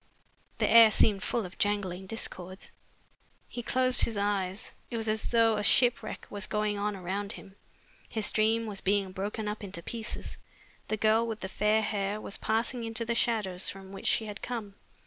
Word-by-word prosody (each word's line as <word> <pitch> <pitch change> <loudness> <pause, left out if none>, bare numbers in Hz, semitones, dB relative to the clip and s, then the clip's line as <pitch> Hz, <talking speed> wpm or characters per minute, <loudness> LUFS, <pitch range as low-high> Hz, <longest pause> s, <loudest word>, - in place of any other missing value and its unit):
The - - +2
air 230 -1 +9
seemed 205 -1 +3
full 230 0 -1
of 180 - -11
jangling 195 -3 0
discords. 185 -3 -6 0.8
He 240 - -6
closed 255 +1 +3
his 225 -3 +1
eyes. 200 -1 -1 0.2
It 235 - -3
was 225 0 -1
as 215 0 0
though 230 -2 +3
a 210 - -1
shipwreck 245 +2 +2
was 205 0 -3
going 210 -1 0
on 205 0 -1
around 195 +2 -3
him. 195 -1 -12 0.5
His 220 -2 -1
dream 225 +1 +2
was 205 -3 -4
being 195 -1 +1
broken 205 +3 -3
up 210 0 -4
into 185 -4 -6
pieces. 225 +3 -5 0.5
The 215 - -1
girl 220 +2 +3
with 220 -1 -4
the 190 - -3
fair 215 +2 +2
hair 205 0 -1
was 200 - -6
passing 230 +2 -1
into 225 0 -2
the 235 - 0
shadows 210 -6 +1
from 195 0 -9
which 195 - -5
she 220 - +3
had 210 -1 -7
come. 225 -5 -4
210 Hz, 185 wpm, -30 LUFS, 195-225 Hz, 0.8 s, air